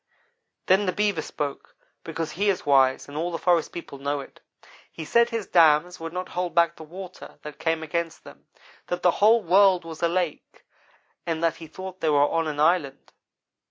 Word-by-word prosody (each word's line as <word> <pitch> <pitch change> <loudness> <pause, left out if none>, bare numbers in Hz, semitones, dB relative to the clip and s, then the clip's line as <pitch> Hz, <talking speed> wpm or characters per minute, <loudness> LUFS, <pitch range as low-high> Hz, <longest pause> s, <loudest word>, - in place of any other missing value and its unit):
Then 190 +2 +3
the - - +2
Beaver 205 -5 0
spoke, 145 -2 -6 0.3
because 165 -1 -4
he 205 +3 0
is 190 - -1
wise 135 -2 +3
and 145 - -11
all 170 +3 -2
the 165 - -3
forest 175 -2 +1
people 165 -5 -9
know 140 +1 -2
it. 140 - -11 0.5
He 160 - -8
said 235 +7 +3
his 230 -4 -3
dams 165 +1 +4
would 165 0 -6
not 180 +1 -5
hold 180 -1 -3
back 170 -1 +3
the - - -11
water 185 +3 -10
that 150 0 -9
came 160 0 -1
against 165 +1 -4
them; - - -15 0.4
that 175 - -4
the 180 - +5
whole 225 +2 +5
world 185 0 +4
was 160 -1 -9
a 170 - +3
lake, 175 -3 -3 0.6
and 165 -1 -2
that 165 -1 +1
he 165 - -10
thought 185 +3 -9
they 160 - +1
were 145 - +3
on 165 0 -1
an 150 -1 -4
island. 150 -4 +1
170 Hz, 195 wpm, -25 LUFS, 155-185 Hz, 0.6 s, the